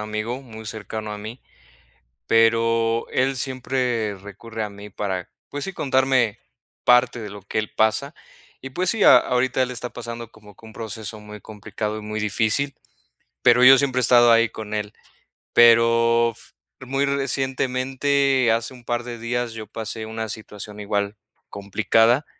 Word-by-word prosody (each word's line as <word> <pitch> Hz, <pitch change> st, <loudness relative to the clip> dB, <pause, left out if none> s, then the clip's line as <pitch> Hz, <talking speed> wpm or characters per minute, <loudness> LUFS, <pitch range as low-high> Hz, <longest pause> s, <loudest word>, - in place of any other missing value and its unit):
amigo 110 Hz, +4 st, -4 dB
muy 110 Hz, -3 st, -11 dB
cercano 110 Hz, -1 st, -6 dB
a 105 Hz, -, -6 dB
mí, 110 Hz, +4 st, -8 dB, 0.9 s
pero 115 Hz, 0 st, +2 dB
él 135 Hz, +1 st, +1 dB
siempre 125 Hz, -4 st, -2 dB
recurre 105 Hz, +4 st, -8 dB
a 105 Hz, -, -4 dB
mí 100 Hz, +1 st, -11 dB
para, 95 Hz, -3 st, -4 dB, 0.2 s
pues 145 Hz, 0 st, -5 dB
sí, 195 Hz, -, -5 dB
contarme 130 Hz, -, +1 dB, 0.5 s
parte 125 Hz, 0 st, +4 dB
de 105 Hz, -2 st, -6 dB
lo 100 Hz, 0 st, -10 dB
que 100 Hz, +3 st, -3 dB
él 110 Hz, -, -3 dB
pasa 110 Hz, +7 st, +1 dB, 0.5 s
y 135 Hz, -, -7 dB
pues 180 Hz, +7 st, -1 dB
sí, 220 Hz, -3 st, 0 dB
a -, -, +9 dB
ahorita 125 Hz, +1 st, 0 dB
él 130 Hz, -, 0 dB
está 125 Hz, 0 st, -5 dB
pasando 115 Hz, -1 st, -8 dB
como 105 Hz, -2 st, -17 dB
que 110 Hz, -, -17 dB
un 110 Hz, -, -12 dB
proceso 110 Hz, -1 st, -7 dB
muy 105 Hz, 0 st, -11 dB
complicado 105 Hz, +1 st, -5 dB
y -, -, -7 dB
muy 105 Hz, 0 st, -4 dB
difícil, 110 Hz, +7 st, 0 dB, 0.7 s
pero 120 Hz, +1 st, +5 dB
yo 135 Hz, +1 st, +9 dB
siempre 130 Hz, -2 st, +1 dB
he -, -, +1 dB
estado 120 Hz, 0 st, +6 dB
ahí 115 Hz, 0 st, +4 dB
con 105 Hz, -1 st, -8 dB
él. 105 Hz, -1 st, -3 dB, 0.6 s
Pero 115 Hz, 0 st, +5 dB
f -, -, -14 dB, 0.3 s
muy 135 Hz, +2 st, -1 dB
recientemente 135 Hz, -1 st, +1 dB
hace 115 Hz, +3 st, -2 dB
un 125 Hz, -2 st, -15 dB
par 120 Hz, 0 st, -2 dB
de 120 Hz, -1 st, -7 dB
días, 120 Hz, +1 st, -2 dB
yo 110 Hz, -1 st, -8 dB
pasé 110 Hz, +1 st, -6 dB
una 110 Hz, 0 st, -5 dB
situación 105 Hz, -1 st, -8 dB
igual, 100 Hz, 0 st, -2 dB, 0.3 s
complicada, 115 Hz, +6 st, +2 dB
115 Hz, 165 wpm, -22 LUFS, 110-125 Hz, 0.9 s, a